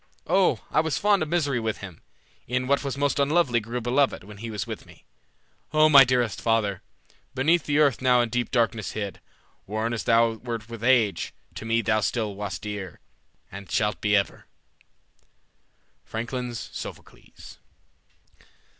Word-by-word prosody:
O, 185 Hz, +2 st, +2 dB
I -, -, +3 dB
was 160 Hz, -2 st, 0 dB
fond 205 Hz, -2 st, +3 dB
of 155 Hz, -, -2 dB
misery 145 Hz, -7 st, +1 dB
with 110 Hz, -1 st, -2 dB
him; 95 Hz, -5 st, -10 dB, 0.5 s
E'en 125 Hz, +1 st, 0 dB
what 140 Hz, +2 st, +1 dB
was 135 Hz, -2 st, -3 dB
most 145 Hz, 0 st, 0 dB
unlovely 140 Hz, -4 st, +3 dB
grew 115 Hz, +3 st, -4 dB
beloved 125 Hz, +1 st, +1 dB
When 105 Hz, +1 st, -12 dB
he 115 Hz, +3 st, -6 dB
was 105 Hz, -5 st, -4 dB
with -, -, -7 dB
me. -, -, -18 dB, 0.7 s
O 155 Hz, 0 st, +5 dB
my 140 Hz, -2 st, +10 dB
dearest 125 Hz, -4 st, 0 dB
father, 110 Hz, -4 st, +1 dB, 0.5 s
Beneath 160 Hz, +5 st, +2 dB
the 145 Hz, 0 st, +1 dB
earth 145 Hz, -6 st, +3 dB
now 125 Hz, -1 st, +4 dB
in 120 Hz, -, -1 dB
deep 125 Hz, +1 st, -1 dB
darkness 115 Hz, -4 st, 0 dB
hid, 100 Hz, -3 st, -5 dB, 0.5 s
Worn 110 Hz, +3 st, -2 dB
as 115 Hz, -, -3 dB
thou 115 Hz, 0 st, +4 dB
wert 115 Hz, -1 st, -6 dB
with 115 Hz, -1 st, -8 dB
age, 115 Hz, -8 st, +2 dB, 0.2 s
to -, -, -8 dB
me 115 Hz, +1 st, +1 dB
thou 110 Hz, +1 st, +2 dB
still 110 Hz, -1 st, -1 dB
Wast 100 Hz, -3 st, -5 dB
dear, 105 Hz, -5 st, -6 dB, 0.5 s
and 100 Hz, 0 st, -9 dB
shalt 105 Hz, 0 st, 0 dB
be 105 Hz, 0 st, +2 dB
ever." 100 Hz, -1 st, -1 dB, 1.6 s
Francklin's 120 Hz, +1 st, -5 dB
Sophocles. -, -, -10 dB
115 Hz, 160 wpm, -25 LUFS, 105-135 Hz, 1.6 s, my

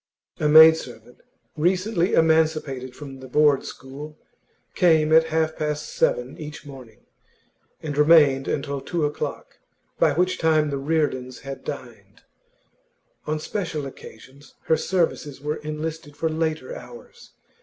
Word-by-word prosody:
A 150 Hz, -, +1 dB
maid 160 Hz, +1 st, +9 dB
servant, 120 Hz, -4 st, -11 dB, 0.4 s
recently 180 Hz, +3 st, +1 dB
emancipated 155 Hz, -5 st, +1 dB
from 135 Hz, -2 st, -10 dB
the 130 Hz, -, -10 dB
Board 145 Hz, +1 st, +3 dB
school, 145 Hz, +4 st, -9 dB, 0.6 s
came 160 Hz, -4 st, +3 dB
at 160 Hz, 0 st, +6 dB
half 160 Hz, 0 st, -1 dB
past 150 Hz, -1 st, -3 dB
seven -, -, 0 dB
each 150 Hz, -1 st, -9 dB
morning, 130 Hz, -5 st, -13 dB, 0.8 s
and 150 Hz, -2 st, -4 dB
remained 145 Hz, -3 st, +5 dB
until 140 Hz, -1 st, -3 dB
two 160 Hz, +2 st, -2 dB
o'clock, 145 Hz, -, -5 dB, 0.4 s
by 150 Hz, -, +4 dB
which 180 Hz, +4 st, 0 dB
time 155 Hz, -2 st, +2 dB
the 140 Hz, -, -2 dB
Reardons 135 Hz, -4 st, -2 dB
had 135 Hz, 0 st, -8 dB
dined; -, -, -9 dB, 1.0 s
on 155 Hz, +1 st, -1 dB
special 165 Hz, -4 st, -4 dB
occasions, 135 Hz, +1 st, -13 dB
her 160 Hz, -, +2 dB
services 160 Hz, -6 st, -1 dB
were 150 Hz, +2 st, -3 dB
enlisted 155 Hz, 0 st, -6 dB
for 160 Hz, -, -1 dB
later 160 Hz, -, -2 dB
hours. 480 Hz, -1 st, -13 dB
155 Hz, 130 wpm, -23 LUFS, 140-160 Hz, 1.0 s, maid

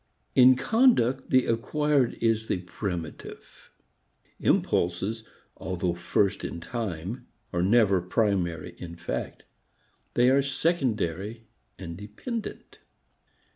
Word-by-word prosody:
In 130 Hz, 0 st, +7 dB
conduct 135 Hz, -, +3 dB
the 130 Hz, -1 st, +4 dB
acquired 135 Hz, +3 st, +1 dB
is 115 Hz, -1 st, 0 dB
the 90 Hz, -, -1 dB
primitive. 90 Hz, -4 st, -7 dB, 0.7 s
Impulses 95 Hz, +6 st, +1 dB, 0.3 s
although 90 Hz, -1 st, -2 dB
first 95 Hz, +3 st, 0 dB
in 85 Hz, -, -4 dB
time 100 Hz, 0 st, -5 dB, 0.3 s
are 85 Hz, -, +1 dB
never 100 Hz, -1 st, +4 dB
primary 90 Hz, -4 st, 0 dB
in 85 Hz, -1 st, -7 dB
fact; -, -, -5 dB, 0.7 s
they 125 Hz, +1 st, +5 dB
are 140 Hz, +1 st, +4 dB
secondary 115 Hz, -, -1 dB, 0.3 s
and 85 Hz, -3 st, -7 dB
dependent. 110 Hz, -, -7 dB
110 Hz, 95 wpm, -27 LUFS, 90-130 Hz, 0.7 s, In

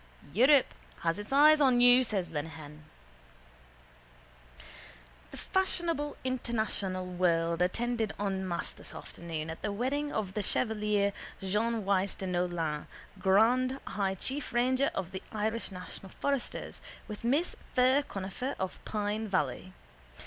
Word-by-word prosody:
—Europe 260 Hz, -, +5 dB, 0.3 s
has 165 Hz, +3 st, 0 dB
its 205 Hz, +3 st, -8 dB
eyes 300 Hz, +2 st, +7 dB
on 255 Hz, -3 st, +5 dB
you, 245 Hz, +1 st, +7 dB
says 200 Hz, -7 st, -1 dB
Lenehan. 150 Hz, -1 st, -6 dB, 2.4 s
The -, -, -9 dB
fashionable 335 Hz, -6 st, 0 dB
international 220 Hz, -7 st, -1 dB
world 170 Hz, -2 st, +1 dB
attended 225 Hz, +4 st, 0 dB
en 195 Hz, -2 st, -1 dB
masse 170 Hz, -1 st, -2 dB
this -, -, -13 dB
afternoon 160 Hz, -2 st, -6 dB
at 160 Hz, -, -8 dB
the 210 Hz, -, -1 dB
wedding 275 Hz, +7 st, -1 dB
of 200 Hz, -4 st, -2 dB
the 210 Hz, -, -1 dB
chevalier 210 Hz, -2 st, +1 dB, 0.3 s
Jean 210 Hz, +3 st, 0 dB
Wyse 195 Hz, 0 st, +1 dB
de 190 Hz, -, -5 dB
Neaulan, 175 Hz, -4 st, -1 dB, 0.3 s
grand 245 Hz, +8 st, +3 dB
high 195 Hz, -2 st, -1 dB
chief 270 Hz, +9 st, -4 dB
ranger 255 Hz, +3 st, +3 dB
of 180 Hz, -1 st, -3 dB
the 190 Hz, 0 st, -5 dB
Irish 220 Hz, +1 st, -1 dB
National 185 Hz, +1 st, -8 dB
Foresters, 280 Hz, -3 st, -2 dB, 0.3 s
with 210 Hz, -1 st, -7 dB
Miss 280 Hz, +9 st, +1 dB, 0.2 s
Fir 260 Hz, +2 st, +5 dB
Conifer 200 Hz, +2 st, -4 dB
of 190 Hz, -1 st, -4 dB
Pine 210 Hz, +1 st, -2 dB
Valley. 185 Hz, -2 st, -1 dB
210 Hz, 125 wpm, -31 LUFS, 185-250 Hz, 2.4 s, eyes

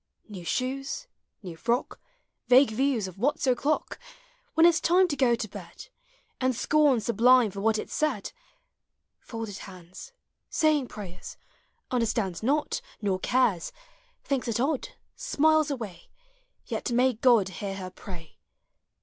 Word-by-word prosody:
New 195 Hz, -5 st, -9 dB
shoes, 265 Hz, -, -3 dB, 0.4 s
New 175 Hz, -3 st, -7 dB
frock, 235 Hz, +9 st, -1 dB, 0.5 s
Vague 255 Hz, 0 st, +6 dB
views 245 Hz, -3 st, 0 dB
Of 185 Hz, 0 st, -11 dB
what 280 Hz, +7 st, +1 dB
's -, -, -1 dB
o'clock, 270 Hz, +4 st, 0 dB, 0.6 s
When 325 Hz, -, +6 dB
it's 335 Hz, -2 st, +5 dB
time 360 Hz, +3 st, +4 dB
To 290 Hz, -, -1 dB
go 255 Hz, -3 st, +3 dB
to 230 Hz, -1 st, -4 dB
bed, 205 Hz, -, -11 dB, 0.5 s
And 255 Hz, -1 st, +1 dB
scorn 290 Hz, 0 st, +3 dB
sublime 235 Hz, 0 st, +4 dB
For 195 Hz, +1 st, -6 dB
what 220 Hz, +1 st, +2 dB
it -, -, -4 dB
said; 300 Hz, -10 st, -1 dB, 0.9 s
Folded 225 Hz, -4 st, -7 dB
hands, 185 Hz, -, -11 dB, 0.4 s
Saying 305 Hz, -4 st, +2 dB
prayers, 190 Hz, -5 st, -9 dB, 0.5 s
Understands 225 Hz, -7 st, 0 dB
Not. 290 Hz, +6 st, 0 dB, 0.2 s
nor 195 Hz, -3 st, -1 dB
cares; 215 Hz, -7 st, +1 dB, 0.5 s
Thinks 275 Hz, -4 st, -2 dB
it 230 Hz, -1 st, -1 dB
odd, 315 Hz, -, 0 dB, 0.3 s
Smiles 315 Hz, -, +2 dB
away; 225 Hz, -10 st, -6 dB, 0.6 s
Yet -, -, -3 dB
may 250 Hz, +1 st, +3 dB
(Sod 230 Hz, -7 st, +5 dB
Hear 195 Hz, +1 st, -5 dB
her 185 Hz, -1 st, -7 dB
pray! 175 Hz, -4 st, -11 dB
240 Hz, 135 wpm, -27 LUFS, 200-280 Hz, 0.9 s, Vague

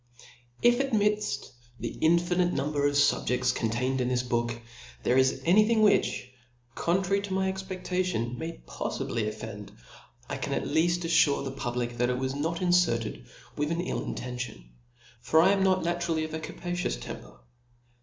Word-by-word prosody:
IF 240 Hz, +1 st, +5 dB
amidd 210 Hz, -, 0 dB, 0.3 s
the -, -, -4 dB
iofinite 175 Hz, +2 st, +3 dB
number 145 Hz, +1 st, 0 dB
of 145 Hz, -, -1 dB
fubjeds 140 Hz, -3 st, +2 dB
contained 125 Hz, +3 st, -1 dB
in 125 Hz, -, 0 dB
this 125 Hz, -1 st, +1 dB
booki 120 Hz, -1 st, -2 dB, 0.4 s
there 125 Hz, -, +2 dB
is 130 Hz, 0 st, +3 dB
any 210 Hz, +5 st, +5 dB
thing, 225 Hz, -1 st, +3 dB
which, 200 Hz, -10 st, +2 dB, 0.5 s
contrary 190 Hz, +5 st, +1 dB
to 200 Hz, -1 st, -5 dB
my 190 Hz, 0 st, +1 dB
expcdlation, 185 Hz, -, -2 dB
may 160 Hz, +5 st, -5 dB
poffibly 115 Hz, -3 st, -3 dB
offend, 105 Hz, -1 st, -7 dB, 0.6 s
I -, -, -4 dB
can -, -, -3 dB
at -, -, -1 dB
lead 165 Hz, +2 st, +3 dB
aflure 165 Hz, -5 st, +2 dB
the 135 Hz, -, -3 dB
pub 125 Hz, -3 st, -4 dB
lic, 120 Hz, -1 st, -2 dB
that 120 Hz, 0 st, +2 dB
it 125 Hz, -, 0 dB
wa^ 130 Hz, +1 st, -2 dB
not 165 Hz, +4 st, -2 dB
inferted 115 Hz, -, +1 dB, 0.3 s
with 150 Hz, +1 st, -1 dB
an 170 Hz, +1 st, -1 dB
ill 180 Hz, -, -2 dB
inten 125 Hz, 0 st, -5 dB
tion: 105 Hz, -, -6 dB, 0.5 s
for 145 Hz, +6 st, +3 dB
1 185 Hz, +3 st, +5 dB
am 195 Hz, -1 st, +2 dB
not 185 Hz, -2 st, +3 dB
naturally 170 Hz, -2 st, 0 dB
of 155 Hz, 0 st, -5 dB
a 160 Hz, -, -2 dB
cap 160 Hz, -, -9 dB
tious 175 Hz, -, -2 dB
temper. -, -, -9 dB
160 Hz, 170 wpm, -28 LUFS, 125-180 Hz, 0.6 s, IF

